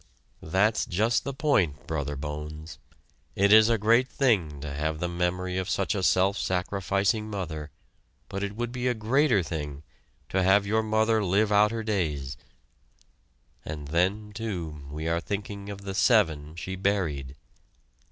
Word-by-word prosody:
That's 95 +7 +1
just 110 +6 +1
the 140 - -2
point, 100 - +1
Brother 75 -2 -3
Bones. 75 0 -7 0.6
It 100 +2 +4
is 110 +1 +8
a 115 - +3
great 115 +4 +3
thing 95 - +1
to 75 -1 -5
have 75 +2 -2
the 90 - -1
memory 90 +1 -1
of 95 +1 -3
such 95 - 0
a 100 - -2
self 95 +2 +3
sacrificing 100 +3 0
mother, 80 -7 -5 0.6
but 100 0 -5
it 100 0 -3
would 120 +1 -3
be 125 0 -2
a 125 - +1
greater 115 -1 +2
thing 75 -3 -5 0.5
to 95 - +1
have 95 +2 +4
your 110 +2 +2
mother 110 0 +2
live 100 +3 +2
out 105 +1 +5
her 115 0 -4
days; 75 -10 -2 1.3
and 75 -2 -6
then, 95 +6 0
too, 90 -9 -5
we 75 +2 -5
are 85 +1 +1
thinking 100 +1 -5
of 100 -1 -7
the 100 -1 -5
"seven" 80 - +2
she 95 +2 -5
buried. 85 -9 -1
95 Hz, 155 wpm, -27 LUFS, 80-105 Hz, 1.3 s, is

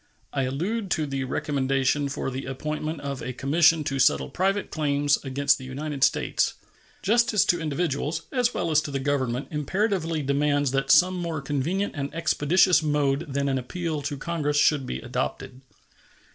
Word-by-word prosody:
I 135 -2 0
allude 190 - -2
to 155 - -1
the 135 -2 -3
recommendation 135 +1 0
for 135 -1 -3
the 130 +1 -5
appointment 150 +3 -4
of 140 -2 -5
a 130 +2 -4
commission 160 +4 +3
to 135 -2 -2
settle 130 - +3
private 195 +2 0
claims 145 -1 +1
against 140 +1 +1
the - - -9
United 140 +2 -4
States. - - +1 0.5
Justice 230 0 +3
to 175 -1 +1
individuals, 155 0 -2
as 245 -3 +1
well 165 - -2
as 155 0 +4
to 155 - -6
the 140 - -2
Government, 130 -2 -1
imperatively 165 0 -1
demands 145 0 +1
that 135 0 -1
some 185 +4 +6
more 170 -3 -3
convenient 145 +8 -2
and 140 -1 -3
expeditious 165 +2 +3
mode 145 0 0
than 140 +1 0
an 135 -1 0
appeal 160 +3 -4
to 145 0 -4
Congress 150 -1 -1
should 145 -3 +3
be 65 - -3
adopted. 130 - -4
145 Hz, 165 wpm, -25 LUFS, 135-165 Hz, 0.5 s, some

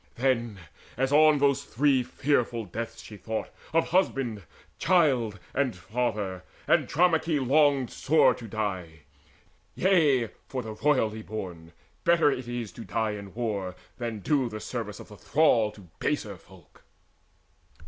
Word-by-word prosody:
Then, 120 -4 0 0.4
as 135 +1 +1
on 155 +1 +6
those 140 -1 +2
three 135 +1 +2
fearful 120 -3 0
deaths 115 +5 -6
she 105 - -10
thought 110 +2 -4 0.2
Of 165 0 +2
husband, 135 - +1 0.4
child, 130 - +2
and 135 -5 0
father, 100 -1 -3 0.2
Andromaehe 165 -2 +2
Longed 140 -2 +3
sore 160 +3 +4
to 115 - -9
die. 95 -7 -4 0.7
Yea, 150 - +3 0.2
for 130 -2 -4
the 110 -1 -6
royally 110 -3 +1
born 90 -7 -7 0.3
Better 170 -4 +4
it 125 -3 -4
is 120 -4 -4
to 115 - -9
die 110 -1 -1
in 100 -1 -8
war, 100 -6 -3 0.2
than 115 -3 -4
do 135 0 +1
The 110 -1 -6
service 110 -3 -5
of - - -11
the 105 - -12
thrall 125 -8 +3
to 100 -4 -15
baser 110 -9 -1
folk. 90 -1 -19
120 Hz, 140 wpm, -27 LUFS, 105-140 Hz, 0.7 s, on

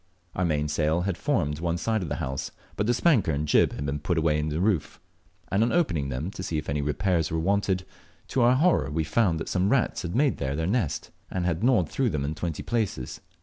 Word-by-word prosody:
Our 90 - 0
mainsail 75 +1 +1
had 95 0 -1
formed 80 - 0
one 85 0 -1
side 110 +4 0
of 85 - -4
our 75 - -2
house, 65 -5 -3 0.3
but 105 - -1
the 120 - +3
spanker 125 - +3
and 75 +1 -1
jib - - +4
had 70 - -4
been 70 +1 -2
put 85 +4 -1
away 80 -1 +2
in 75 +1 -1
the 75 +2 -2
roof, 95 -6 0 0.5
and 100 - +2
on 115 - +2
opening 90 - +1
them 70 +8 -3
to 95 - -7
see 85 -3 -2
if 75 - -4
any 75 0 0
repairs 80 +3 0
were 80 - -1
wanted, 95 +1 +1 0.4
to 130 - +1
our 120 +2 +5
horror 155 - +3
we 80 +2 -1
found 85 0 +1
that 80 - -5
some 95 +1 +1
rats 125 -1 +1
had 85 +2 -4
made 140 +2 +2
them 70 0 -2
their 80 - -1
nest, 100 - -1 0.2
and 90 -2 -2
had 90 +2 -1
gnawed 120 - +4
through 130 - 0
them 75 -7 -2
in 75 - -2
twenty 80 0 -4
places. 105 - -2
85 Hz, 235 wpm, -26 LUFS, 75-105 Hz, 0.5 s, our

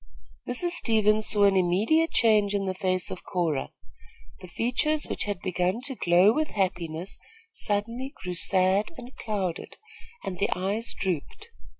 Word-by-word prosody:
Mrs. 345 +8 0
Stevens 215 -7 +3
saw 205 -2 +3
an 200 -1 +5
immediate 205 - +2
change 210 -3 +3
in 195 -1 -1
the 190 - -1
face 185 -1 -1
of 185 - -7
Cora. 165 -7 -1 0.7
The 185 - -11
features 250 - 0
which - - -3
had 205 -3 -3
begun 185 +3 -1
to 265 +1 -3
glow 180 +2 +4
with 310 +3 -2
happiness 180 -3 -2 0.3
suddenly 230 +6 -2
grew 180 -1 -3
sad 190 +3 +2
and 245 +1 -11
clouded, 195 -6 -4 0.5
and 180 -2 -5
the 200 - +1
eyes 200 +5 -1
drooped. 190 - -4
200 Hz, 150 wpm, -26 LUFS, 185-230 Hz, 0.7 s, an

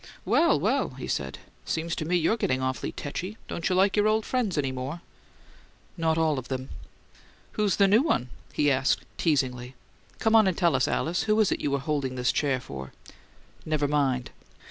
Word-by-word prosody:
"Well, - - +4
well!" - - 0
he - - -6
said. 65 0 -3 0.3
"Seems 165 +1 -2
to 155 - -2
me 175 +3 +1
you're 175 +5 +2
getting 130 - 0
awful 130 0 -2
tetchy! 185 +8 -5
Don't 170 - -2
you 185 - +1
like 190 +1 +3
your 210 0 +3
old 215 0 +2
friends 235 -9 -1
any 135 -3 0
more?" 130 +6 -5 0.9
"Not 160 -2 +1
all 155 -4 +2
of 125 - -9
them." 130 0 -4 0.8
"Who's 210 -2 +1
the 200 - +4
new 210 +5 +5
one?" 200 - 0 0.2
he 145 -1 +2
asked, 135 0 +1 0.2
teasingly. 130 -5 0 0.4
"Come 220 0 +2
on 220 -3 +6
and 185 - 0
tell 170 -5 +3
us, 130 - +2
Alice. 170 +3 0
Who 215 0 +2
is 215 - +3
it - - -1
you - - 0
were 140 - +1
holding 140 -2 -2
this 125 0 +1
chair 135 -3 0
for?" 65 - -8 0.7
"Never 155 -2 0
mind." 135 -4 0
155 Hz, 190 wpm, -27 LUFS, 130-190 Hz, 0.9 s, on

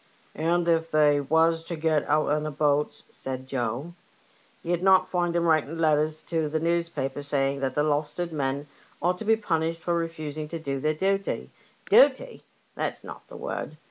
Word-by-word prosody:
*' - - -33
And 170 +2 0
if 165 -1 +2
they 150 -1 +4
was 160 +3 +2
to 170 - -4
go 155 -2 +1
out 155 +1 +2
in 150 - -1
the 155 - -3
boats," 150 0 0
said 130 0 -5
Joe, 130 +5 -3 0.7
^'ye'd 175 0 0
not 190 -1 +5
find 175 -2 -1
'em 170 0 +2
writing 160 -1 +2
letters 155 -1 +1
to 160 -3 -1
the 155 +1 -1
newspapers 165 -4 -2
saying 140 -1 0
that 135 -1 -2
the 150 - +2
Lowestoft 150 +3 -1
men 140 -1 -2 0.3
ought 180 +1 0
to - - -6
be 225 +1 +5
punished 165 -6 -1
for 175 - -1
refusing 155 -3 -3
to 165 - -5
do 140 -4 -3
their 155 +3 0
duty. 195 +3 -1 0.4
Duty! - - +4 0.3
that's - - -3
not - - -10
the - - -10
word. - - -5
155 Hz, 180 wpm, -26 LUFS, 145-170 Hz, 0.7 s, not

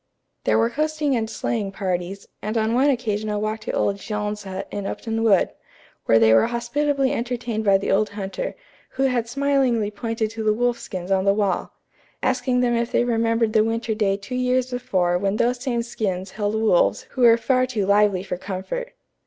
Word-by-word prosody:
There - - +3
were 230 +1 +2
coasting 305 0 0
and 220 -2 -1
sleighing 220 -2 -2
parties, 190 0 -3
and 215 +3 -2
on 220 +1 +1
one 265 +4 +4
occasion 215 -5 -1
a 210 - -1
walk 215 +1 -2
to 215 - -5
old 200 - 0
Jean's 210 0 -4
hut 190 0 -5
in 205 -1 -4
Upton 225 0 -3
Wood, 210 -5 +3 0.5
where 115 - +5
they 110 0 +5
were 115 - +5
hospitably 275 +3 0
entertained 235 -2 -2
by 200 -2 +5
the 195 - -2
old 210 +2 +2
hunter, 205 - -5 0.3
who 270 - -2
had 245 -3 +1
smilingly 260 -5 +1
pointed 225 0 -3
to 225 0 -5
the 215 -1 +2
wolf 245 +1 0
skins 185 0 -6
on 190 -1 +3
the 200 0 +4
wall, 200 -4 -1 0.5
asking 250 -1 +1
them 240 -1 +2
if 235 0 -1
they - - +3
remembered 230 -1 +1
the 215 -2 +5
winter 225 0 -1
day 205 -2 +1
two 200 +4 -9
years 255 0 +1
before 180 -8 0
when 200 +1 0
those 245 +2 +1
same 240 -3 -1
skins 190 -5 -3
held 205 +1 -2
wolves 180 - +2
who 260 - -4
were 230 -1 +7
far 255 +2 +1
too 220 -6 -1
lively 200 -2 +3
for 185 -2 -4
comfort. 200 - -5
220 Hz, 195 wpm, -23 LUFS, 200-245 Hz, 0.5 s, were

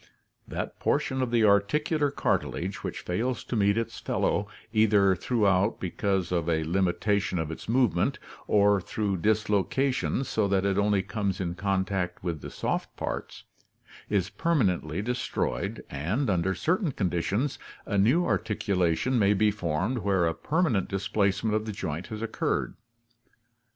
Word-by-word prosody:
That - - -5
portion 130 0 0
of 130 - 0
the 120 -1 +3
articular 145 +9 +2
cartilage 95 -8 -2
which - - -4
fails 120 +8 -2
to - - -4
meet 100 0 +3
its 115 - -3
fellow 100 - 0 0.3
either 105 -3 +4
throughout 100 -2 +1
because 95 -2 -1
of 85 -2 0
a 80 -1 +1
limitation 95 +3 0
of 80 -1 -2
its 80 - -8
movement, 115 -8 +2 0.3
or 100 -1 +4
through 100 +1 -2
dislocation 110 +7 +1
so 110 -6 0
that 100 -1 +1
it 100 0 +1
only 100 -1 +2
comes 100 -1 -2
in 85 -2 -2
contact 95 -1 -1
with 85 -5 -3
the - - -7
soft - - -3
parts, - - -5 0.7
is 100 -2 0
permanently 95 - 0
destroyed 125 +2 -2
and, 100 - -1
under 95 +1 +1
certain 175 - 0
conditions, 100 - -1 0.3
a 105 - -2
new 135 - +4
articulation 105 +2 +1
may 100 0 +4
be 105 +1 +3
formed 100 +5 -1
where 95 -4 +2
a 80 - +1
permanent 135 - 0
displacement 100 +1 0
of 110 0 -1
the - - -2
joint 85 -4 -4
has 110 -1 -6
occurred. 115 - -1
100 Hz, 145 wpm, -27 LUFS, 90-110 Hz, 0.7 s, either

